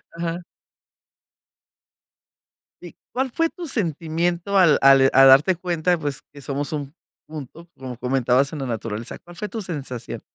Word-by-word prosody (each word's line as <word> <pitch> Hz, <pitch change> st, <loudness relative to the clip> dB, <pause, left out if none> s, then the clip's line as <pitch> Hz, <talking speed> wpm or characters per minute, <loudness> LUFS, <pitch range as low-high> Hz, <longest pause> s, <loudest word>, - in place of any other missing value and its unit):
Ajá. 170 Hz, +1 st, -3 dB, 2.4 s
¿Y -, -, -11 dB, 0.2 s
cuál 260 Hz, 0 st, -2 dB
fue 330 Hz, +4 st, +1 dB
tu 345 Hz, -2 st, -8 dB
sentimiento 175 Hz, -, -1 dB
al 175 Hz, -5 st, +6 dB
al 135 Hz, -1 st, +6 dB
a 135 Hz, 0 st, +7 dB
darte 140 Hz, +8 st, +6 dB
cuenta? 175 Hz, 0 st, 0 dB
Pues, 145 Hz, -4 st, -4 dB
que 140 Hz, -1 st, -13 dB
somos 140 Hz, +2 st, -3 dB
un 145 Hz, -1 st, -5 dB, 0.3 s
punto, 155 Hz, +2 st, -10 dB
como 130 Hz, -2 st, -7 dB
comentabas 130 Hz, +3 st, +1 dB
en 150 Hz, -, -5 dB
la 135 Hz, -, -3 dB
naturaleza, 115 Hz, 0 st, -5 dB
¿cuál 175 Hz, 0 st, -15 dB
fue 210 Hz, +2 st, -5 dB
tu 225 Hz, -, -5 dB
sensación? 140 Hz, -, -6 dB
155 Hz, 145 wpm, -22 LUFS, 135-175 Hz, 2.4 s, a